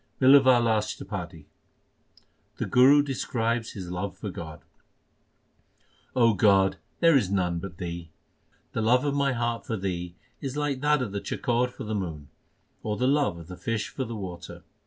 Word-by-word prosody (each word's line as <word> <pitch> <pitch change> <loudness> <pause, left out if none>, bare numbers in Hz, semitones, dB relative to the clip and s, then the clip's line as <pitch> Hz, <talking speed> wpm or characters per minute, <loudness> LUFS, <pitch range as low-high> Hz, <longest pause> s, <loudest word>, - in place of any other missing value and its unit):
BlLAWAL 130 -3 +6
ASHTAPADI 95 -6 -3 1.1
The - - -2
Guru 140 +3 +6
describes 115 -4 -2
his 90 -3 -7
love 95 +2 -4
for 105 - -5
God: 80 -3 -8 1.5
God, 100 -5 +4 0.2
there 165 -2 +6
is 110 -9 +3
none 90 -3 0
but 85 -1 -8
Thee. 85 -2 -6 0.6
The 115 - -2
love 125 +5 +3
of 145 - 0
my 140 -1 +1
heart 120 -1 -2
for 110 - -3
Thee 90 -2 -4 0.3
is 140 0 -4
like 145 -3 -1
that 150 -2 +3
of 110 - -5
the 100 0 -3
chakor 120 +1 0
for 130 - -9
the 110 0 -4
moon, 80 -8 -4 0.5
Or 105 -1 -3
the 125 - 0
love 140 - +2
of 85 - -10
the 90 - -8
fish 115 -2 -2
for 135 - -4
the 115 -2 -6
water. 95 -4 -8
110 Hz, 160 wpm, -27 LUFS, 90-130 Hz, 1.5 s, BlLAWAL